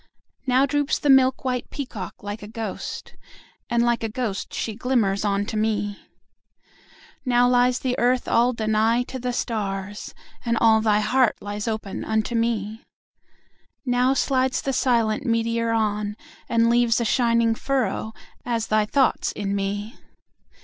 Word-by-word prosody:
Now 260 +2 +4
droops 290 +1 0
the 290 - +2
milk 265 0 +4
white 250 -1 -2
peacock 235 -9 -7
like 205 +2 -5
a 205 - -8
ghost, 220 0 -6
5 - - -25 0.5
And 235 -1 +2
like 240 -1 +1
a 225 - -1
ghost 215 -3 -3
she 220 - -3
glimmers 215 -5 0
on 200 -1 0
to 220 - -5
me. 205 -1 -1 1.2
Now 245 -1 +3
lies 250 0 +3
the 255 -1 -1
Earth 245 +1 +2
all 240 +2 +3
Danaë 225 +1 +1
to 260 - -7
the 250 0 -2
stars, 205 -4 -4 0.3
And 235 -2 0
all 220 -1 +5
thy 215 -1 +2
heart 250 +2 +2
lies 205 +2 -5
open 215 -3 -3
unto 220 +2 -1
me. 225 -2 -1 1.0
Now 250 +1 +2
slides 260 -1 +1
the 270 - -1
silent 230 -4 +1
meteor 230 -1 0
on, 210 -2 0 0.3
and 230 0 +3
leaves 235 0 +3
A 235 - 0
shining 230 0 +2
furrow, 225 -4 -1 0.3
as 230 -2 -1
thy 215 -1 +2
thoughts 270 +3 +1
in 200 -1 -3
me. 205 +3 -3
230 Hz, 150 wpm, -23 LUFS, 215-250 Hz, 1.2 s, all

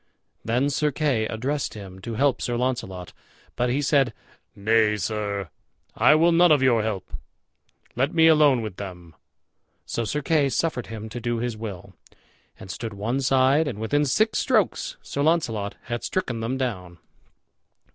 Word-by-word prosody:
Then 125 +5 +1
Sir 150 +1 +1
Kay 130 -7 0
addressed 135 +5 -3
him 95 -3 -9
to 115 +4 -5
help 135 +2 +1
Sir 120 -1 -1
Launcelot, 105 -8 -3 0.4
but 125 0 0
he 140 +4 0
said, 135 -5 +2 0.4
"Nay, 105 +1 +2
sir, 100 -3 -3 0.4
I 150 - +5
will 165 +2 +4
none 170 0 +5
of 145 -3 +4
your 120 -4 +4
help; 105 -3 -4 0.8
let 135 +5 +1
me 160 -1 +4
alone 150 -6 +5
with 105 -4 -6
them." 90 -4 -8 0.7
So 115 - -2
Sir 145 +7 -2
Kay 145 -2 +2
suffered 135 -4 -1
him 110 -1 -7
to 120 - -6
do 120 0 -1
his 120 0 -2
will, 105 -5 -8 0.7
and 95 - -8
stood 110 0 -6
one 115 +7 -2
side. 135 +3 +3
And 125 -8 -4
within 145 +7 +1
six 215 - +2
strokes 220 -7 0
Sir 140 - -4
Launcelot 120 -11 0
had 120 0 -4
stricken 130 -11 -2
them 115 +4 -2
down. 95 -10 -4
120 Hz, 160 wpm, -24 LUFS, 110-145 Hz, 0.8 s, I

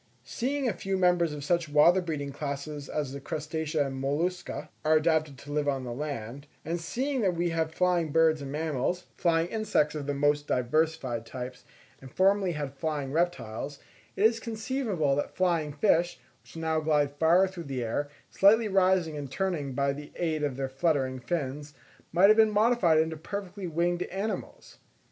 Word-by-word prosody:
Seeing 275 +3 -2
that 235 - +1
a - - -16
few 195 0 -1
members 175 -3 +3
of 145 -1 -6
such 170 +1 0
water 160 +5 +5
breathing 150 -5 -4
classes 140 0 -5
as 145 -4 -2
the 140 - -6
Crustacea 155 +1 -2
and 135 -1 -5
Mollusca 170 +6 -2
are 155 +1 +4
adapted 155 -3 +1
to 145 +4 -10
live 145 0 0
on 135 -2 0
the 120 -1 -5
land; 140 -1 -5 0.2
and 165 +2 -2
seeing 260 - -2
that 185 -4 +1
we 170 0 0
have 160 -1 -1
flying 175 -2 +1
birds 160 -1 +3
and 135 -1 -6
mammals, 160 +3 -1
flying 165 -2 +2
insects 210 -9 +1
of 145 -2 -5
the 145 - -1
most 145 +1 +1
diversified 130 -2 0
types, 125 0 -7 0.4
and 130 -1 -11
formerly 195 +1 +3
had 145 -3 -4
flying 145 -2 -3
reptiles, 140 -5 -2 0.4
it 200 - +2
is 225 +1 +4
conceivable 220 - -1
that 145 - -3
flying 170 -5 +1
fish, 170 +2 +2 0.2
which - - -14
now 160 -1 0
glide 150 -2 +2
far 175 +4 +5
through 185 -2 -8
the 130 -3 -3
air, 145 +6 -2 0.2
slightly 215 +3 +5
rising 185 -5 +2
and 145 -2 -5
turning 160 -5 -2
by 140 +1 +1
the 145 +1 -9
aid 160 -3 -1
of 145 -3 -1
their 135 -1 -1
fluttering 135 -2 0
fins, 145 +2 -4 0.4
might 180 +4 +6
have 215 - +6
been 220 -1 +6
modified 210 -6 +3
into 160 +1 +1
perfectly 195 +3 -6
winged 175 +2 0
animals. 195 +5 -5
160 Hz, 180 wpm, -28 LUFS, 145-180 Hz, 0.4 s, might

